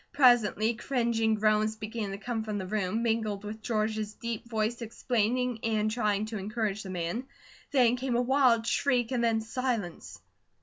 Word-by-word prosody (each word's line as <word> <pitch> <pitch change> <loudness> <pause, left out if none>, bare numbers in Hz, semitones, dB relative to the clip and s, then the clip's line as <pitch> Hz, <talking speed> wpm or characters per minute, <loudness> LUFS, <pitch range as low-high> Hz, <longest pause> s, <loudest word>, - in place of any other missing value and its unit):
Presently 235 -4 +4
cringing 230 -3 0
groans 215 0 +2
began 215 -1 -4
to 195 - -5
come 225 +1 -3
from 215 -1 -3
the 190 - -3
room, 210 +3 -1
mingling 220 -3 0
with 210 +1 -7
George's 215 -2 -1
deep 235 0 -5
voice 225 +1 -1
explaining, 240 +1 0
and 215 -1 +1
trying 215 -2 0
to 215 -1 -5
encourage 215 0 -2
the 195 - -8
man. 180 +7 -3 0.4
Then 250 -3 +4
came 255 -1 -1
a 240 - +3
wild 250 -3 +3
shriek 245 0 +1
and 245 -2 0
then 225 -1 +2
silence. 225 -6 -3
220 Hz, 165 wpm, -29 LUFS, 215-240 Hz, 0.4 s, Presently